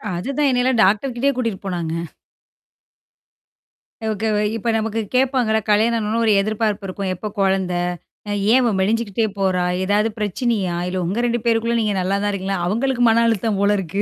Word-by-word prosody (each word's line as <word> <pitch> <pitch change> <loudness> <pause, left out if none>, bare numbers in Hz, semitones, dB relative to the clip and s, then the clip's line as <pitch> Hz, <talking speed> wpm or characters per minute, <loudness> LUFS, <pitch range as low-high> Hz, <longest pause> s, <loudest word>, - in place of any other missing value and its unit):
அதுதான், 275 +11 -1
என்னையெல்லாம் 250 -1 +1
டாக்டர்கிட்டயே 240 +7 +1
கூட்டிட்டு 230 -6 -2
போனாங்க. 170 -4 -3 2.2
ஓகே. 215 +1 -2 0.3
இப்ப 230 +1 -1
நமக்கு 225 0 -1
கேப்பாங்கள்ல, 250 -4 +2
கல்யாணம் 225 +3 +3
ஆனவொன்னே 215 +2 -1
ஒரு 215 - +4
எதிர்பார்ப்பு 215 -1 -1
இருக்கும். 190 0 -3
எப்போ 210 +4 -5
கொழந்த? 190 -2 +1 0.8
ஏன் - - +6
அவ 235 - +2
மெலிஞ்சுக்கிட்டே 220 +2 0
போறா? 185 -2 +1 0.2
ஏதாவது 210 +3 +2
பிரச்சனையா? 205 -3 -1
இல்ல 185 0 -2
உங்க 195 +7 -2
2 240 0 0
பேருக்குள்ள 230 0 +1
நீங்க 210 -2 0
நல்லா 190 +2 0
தான் 205 - +1
இருக்கீங்களா? 195 -1 -2
அவங்களுக்கு 245 +5 0
மன 230 +1 +4
அழுத்தம் 220 -2 0
போல 205 +1 +3
இருக்கு! 195 +2 -2
215 Hz, 150 wpm, -20 LUFS, 195-235 Hz, 2.2 s, ஏன்